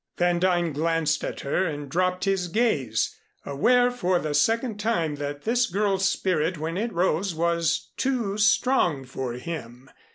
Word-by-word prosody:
Van 175 Hz, 0 st, +2 dB
Duyn 175 Hz, -3 st, +1 dB
glanced 160 Hz, 0 st, 0 dB
at -, -, -4 dB
her 140 Hz, +7 st, 0 dB
and 145 Hz, -2 st, -5 dB
dropped 180 Hz, +4 st, 0 dB
his 195 Hz, -2 st, 0 dB
gaze, 160 Hz, -, 0 dB, 0.3 s
aware 245 Hz, -, +3 dB
for 185 Hz, -7 st, 0 dB
the 155 Hz, -3 st, -3 dB
second 225 Hz, -, +1 dB
time 170 Hz, -9 st, 0 dB
that 145 Hz, 0 st, -5 dB
this 240 Hz, +1 st, +2 dB
girl's 195 Hz, 0 st, +1 dB
spirit 175 Hz, -1 st, 0 dB
when 160 Hz, +2 st, -4 dB
it 225 Hz, +5 st, -2 dB
rose 180 Hz, 0 st, 0 dB
was 170 Hz, 0 st, 0 dB
too 245 Hz, -7 st, -1 dB
strong 205 Hz, -, +2 dB
for 130 Hz, -1 st, -5 dB
him. 125 Hz, -2 st, -7 dB
175 Hz, 155 wpm, -25 LUFS, 150-200 Hz, 0.3 s, aware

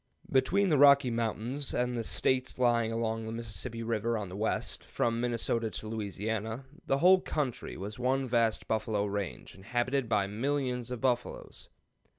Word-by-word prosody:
Between 190 Hz, +10 st, +3 dB
the 150 Hz, -4 st, +3 dB
Rocky 140 Hz, -3 st, +7 dB
Mountains 115 Hz, +4 st, -2 dB
and 125 Hz, 0 st, 0 dB
the 115 Hz, -, -2 dB
States 130 Hz, +8 st, 0 dB
lying 120 Hz, -2 st, +2 dB
along 115 Hz, 0 st, -1 dB
the -, -, -4 dB
Mississippi 115 Hz, +1 st, -5 dB
River 115 Hz, 0 st, 0 dB
on 100 Hz, -3 st, -4 dB
the 90 Hz, -, -8 dB
west, 110 Hz, +2 st, -1 dB
from 115 Hz, 0 st, -1 dB
Minnesota 115 Hz, -1 st, 0 dB
to 110 Hz, -, -6 dB
Louisiana, 110 Hz, +3 st, -3 dB, 0.2 s
the 135 Hz, -, +2 dB
whole 185 Hz, +5 st, +6 dB
country 135 Hz, -6 st, -3 dB
was 105 Hz, +4 st, -6 dB
one 130 Hz, +1 st, +1 dB
vast 115 Hz, -2 st, +1 dB
buffalo 110 Hz, -2 st, 0 dB
range, 100 Hz, -2 st, -4 dB
inhabited 120 Hz, +5 st, -1 dB
by 105 Hz, -3 st, +2 dB
millions 125 Hz, +3 st, -1 dB
of 125 Hz, -2 st, -5 dB
buffaloes. 125 Hz, -2 st, -2 dB
115 Hz, 160 wpm, -30 LUFS, 110-130 Hz, 0.2 s, Rocky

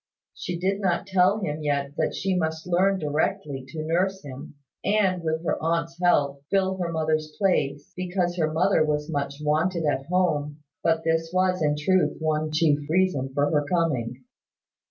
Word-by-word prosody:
She 175 Hz, -, -4 dB
did 195 Hz, +3 st, -1 dB
not 185 Hz, -1 st, 0 dB
tell 190 Hz, +1 st, +3 dB
him 155 Hz, -4 st, -3 dB
yet 140 Hz, -2 st, -1 dB
that -, -, 0 dB
she 190 Hz, -1 st, 0 dB
must 160 Hz, -2 st, -2 dB
learn 185 Hz, +2 st, +2 dB
directly 145 Hz, -3 st, -2 dB
to 155 Hz, +3 st, -5 dB
nurse 185 Hz, +4 st, 0 dB
him, 140 Hz, +2 st, -9 dB, 0.3 s
and, 195 Hz, -3 st, +2 dB
with 160 Hz, +1 st, -2 dB
her -, -, -1 dB
aunt's 165 Hz, +1 st, -1 dB
help, 140 Hz, -6 st, +2 dB
fill 190 Hz, -1 st, +1 dB
her 175 Hz, -2 st, -2 dB
mother's 155 Hz, -1 st, -1 dB
place, 145 Hz, -8 st, 0 dB
because 180 Hz, -1 st, -1 dB
her 155 Hz, -2 st, +1 dB
mother 160 Hz, +2 st, +3 dB
was 150 Hz, 0 st, -1 dB
much 140 Hz, -2 st, -2 dB
wanted 160 Hz, +3 st, +1 dB
at 135 Hz, -2 st, -1 dB
home: 155 Hz, -5 st, 0 dB, 0.2 s
but 165 Hz, 0 st, +2 dB
this 165 Hz, 0 st, 0 dB
was 185 Hz, 0 st, +1 dB
in 150 Hz, -1 st, +2 dB
truth 185 Hz, +5 st, +2 dB
one 155 Hz, -1 st, 0 dB
chief 155 Hz, -2 st, +3 dB
reason 160 Hz, -7 st, +1 dB
for 145 Hz, 0 st, +2 dB
her 150 Hz, -2 st, +2 dB
coming. 135 Hz, -7 st, -1 dB
160 Hz, 170 wpm, -25 LUFS, 150-180 Hz, 0.3 s, tell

